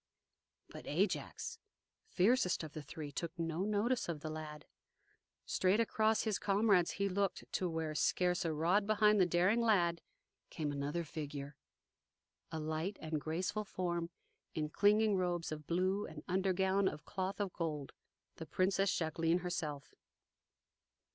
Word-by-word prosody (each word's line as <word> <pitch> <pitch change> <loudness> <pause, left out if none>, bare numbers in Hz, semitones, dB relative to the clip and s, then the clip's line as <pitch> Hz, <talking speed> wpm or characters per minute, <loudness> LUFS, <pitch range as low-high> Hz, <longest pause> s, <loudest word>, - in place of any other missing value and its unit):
But - - -10
Ajax, 465 0 -1 0.5
fiercest 195 - +2
of 155 -2 -7
the 155 - -5
three, 145 +1 -7
took 170 +4 -4
no 165 -1 -2
notice 215 +2 +1
of 155 -3 -3
the 155 - -4
lad. 155 -1 -7 0.8
Straight 190 +3 +2
across 220 -1 +2
his 215 -3 0
comrades 200 -3 +3
he 200 0 0
looked 195 0 -1
to 185 - 0
where, 160 -1 -2
scarce 180 +3 +2
a 165 - 0
rod 175 +7 +2
behind 210 -1 +4
the 180 - +5
daring 185 +7 +3
lad, 175 -7 +3 0.5
came 150 -2 -2
another 145 +4 -2
figure, 145 -2 -6 1.0
a 160 - -3
light 160 +5 -2
and 155 -1 -3
graceful 185 +8 -2
form 175 -4 -2 0.5
in 155 -1 -1
clinging 210 +3 +4
robes 175 -3 -1
of 150 -1 -6
blue 185 +4 +1
and - - -10
undergown 190 +1 +2
of 150 - -10
cloth 190 +1 -3
of 200 -3 -2
gold 150 -5 -3 0.5
the 160 - -7
Princess 195 +2 +2
Jacqueline 165 +1 +1
herself! 150 -5 -4
175 Hz, 140 wpm, -35 LUFS, 155-200 Hz, 1.0 s, the